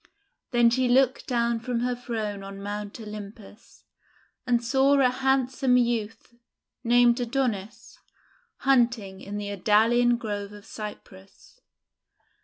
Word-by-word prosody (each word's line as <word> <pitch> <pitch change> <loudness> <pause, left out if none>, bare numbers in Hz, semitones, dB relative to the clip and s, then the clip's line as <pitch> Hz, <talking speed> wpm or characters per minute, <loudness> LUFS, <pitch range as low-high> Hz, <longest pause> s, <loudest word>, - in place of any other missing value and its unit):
Then 240 -2 +4
she 255 +1 +1
looked 260 +1 +2
down 235 -2 0
from 235 +1 -3
her 250 0 0
throne 220 -5 -4
on 195 0 -9
Mount 205 +2 -6
Olympus, 210 0 -11 0.6
and 240 -1 +2
saw 270 +3 +3
a 255 -2 +4
handsome 265 -1 +1
youth, 235 -1 -2 0.5
named 240 0 +4
Adonis, 235 -4 -3 0.6
hunting 235 -7 +1
in 205 +1 -6
the 205 -1 -4
Idalian 230 +5 +3
Grove 205 -3 -5
of 205 0 -13
Cyprus. 210 - -11
235 Hz, 115 wpm, -26 LUFS, 210-250 Hz, 0.6 s, Then